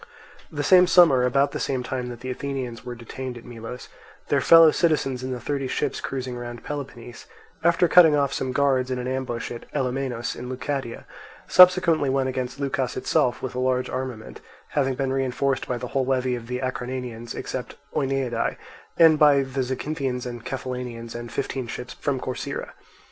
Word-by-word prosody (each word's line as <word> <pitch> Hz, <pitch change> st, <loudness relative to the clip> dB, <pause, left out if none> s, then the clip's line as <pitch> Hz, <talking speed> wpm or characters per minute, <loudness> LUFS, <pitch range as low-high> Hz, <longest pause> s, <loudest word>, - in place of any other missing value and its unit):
The 145 Hz, -2 st, -3 dB
same 180 Hz, +4 st, +6 dB
summer, 165 Hz, -9 st, +6 dB
about 140 Hz, +2 st, +2 dB
the -, -, -4 dB
same 130 Hz, -2 st, -1 dB
time 125 Hz, -1 st, -4 dB
that 120 Hz, -1 st, -8 dB
the 130 Hz, 0 st, -4 dB
Athenians 130 Hz, -3 st, -5 dB
were 125 Hz, -1 st, -6 dB
detained 125 Hz, +2 st, -7 dB
at 120 Hz, -, -12 dB
Melos, 120 Hz, +1 st, -8 dB, 0.4 s
their -, -, +2 dB
fellow 165 Hz, -1 st, +8 dB
citizens 145 Hz, -7 st, +1 dB
in 130 Hz, -, -4 dB
the 125 Hz, -, -3 dB
thirty 135 Hz, +2 st, -2 dB
ships -, -, -2 dB
cruising 130 Hz, -2 st, -4 dB
round 120 Hz, -1 st, -7 dB
Peloponnese, 135 Hz, -5 st, -7 dB, 0.4 s
after 170 Hz, +1 st, +4 dB
cutting 165 Hz, -3 st, +7 dB
off 140 Hz, -2 st, +1 dB
some 130 Hz, -, -2 dB
guards 130 Hz, -1 st, +2 dB
in 130 Hz, -, -1 dB
an 125 Hz, 0 st, -4 dB
ambush 130 Hz, -3 st, -3 dB
at 120 Hz, -, -9 dB
Ellomenus 130 Hz, -3 st, -2 dB
in 125 Hz, +1 st, -7 dB
Leucadia, 130 Hz, -1 st, -4 dB, 0.4 s
subsequently 180 Hz, -5 st, +6 dB
went 135 Hz, 0 st, +1 dB
against 130 Hz, +1 st, -4 dB
Leucas 135 Hz, -2 st, -2 dB
itself 125 Hz, -1 st, +1 dB
with 130 Hz, -, -3 dB
a 125 Hz, -, -3 dB
large 130 Hz, 0 st, 0 dB
armament, 125 Hz, -4 st, -5 dB, 0.3 s
having 135 Hz, -3 st, 0 dB
been 135 Hz, 0 st, -1 dB
reinforced 135 Hz, 0 st, 0 dB
by 125 Hz, -, -1 dB
the 125 Hz, 0 st, -6 dB
whole 135 Hz, -, 0 dB
levy 130 Hz, -1 st, +1 dB
of 120 Hz, -2 st, -5 dB
the 125 Hz, +1 st, -3 dB
Acarnanians 125 Hz, -2 st, -4 dB
except -, -, -5 dB, 0.2 s
Oeniadae, 135 Hz, -4 st, -1 dB, 0.4 s
and 160 Hz, -2 st, +6 dB
by 145 Hz, -2 st, +6 dB
the 135 Hz, 0 st, -3 dB
Zacynthians 130 Hz, 0 st, -3 dB
and 120 Hz, -2 st, -6 dB
Cephallenians 125 Hz, -3 st, -5 dB
and 120 Hz, 0 st, -7 dB
fifteen 130 Hz, -3 st, -3 dB
ships 125 Hz, +2 st, -6 dB
from 140 Hz, -2 st, -2 dB
Corcyra. 130 Hz, -, -4 dB
130 Hz, 175 wpm, -24 LUFS, 125-140 Hz, 0.4 s, fellow